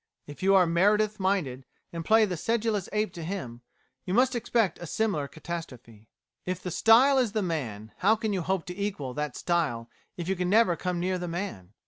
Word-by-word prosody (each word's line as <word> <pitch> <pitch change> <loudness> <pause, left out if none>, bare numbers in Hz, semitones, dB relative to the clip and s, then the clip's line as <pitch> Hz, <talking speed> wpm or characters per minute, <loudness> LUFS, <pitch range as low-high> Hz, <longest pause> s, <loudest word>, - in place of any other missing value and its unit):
If 145 - -11
you 195 +1 +4
are 185 -2 +6
Meredith 210 +5 +2
minded, 180 -10 -1 0.3
and 165 -1 -4
play 220 +5 +5
the 185 -3 -3
sedulous 220 +1 -1
ape 210 0 -1
to 170 - -7
him, 155 -10 -5 0.4
you 185 - -2
must 255 +2 +4
expect 230 -5 0
a 175 - -7
similar 180 -8 -1
catastrophe. 130 -10 -8 0.4
_If 185 -1 -2
the 180 - -5
style 245 - +5
is 235 -5 0
the 215 -2 0
man, 115 - -4
how 210 +4 +4
can 220 -1 -2
you 190 - -1
hope 185 0 -1
to 180 - -7
equal 190 -10 -3
that 150 -1 -3
style 150 -10 -1 0.3
if 175 -1 -5
you 190 - 0
can 180 0 -1
never 210 -3 +4
come 180 0 -3
near 185 +1 -1
the 175 - -4
man? 165 - -5
180 Hz, 200 wpm, -27 LUFS, 160-210 Hz, 0.4 s, are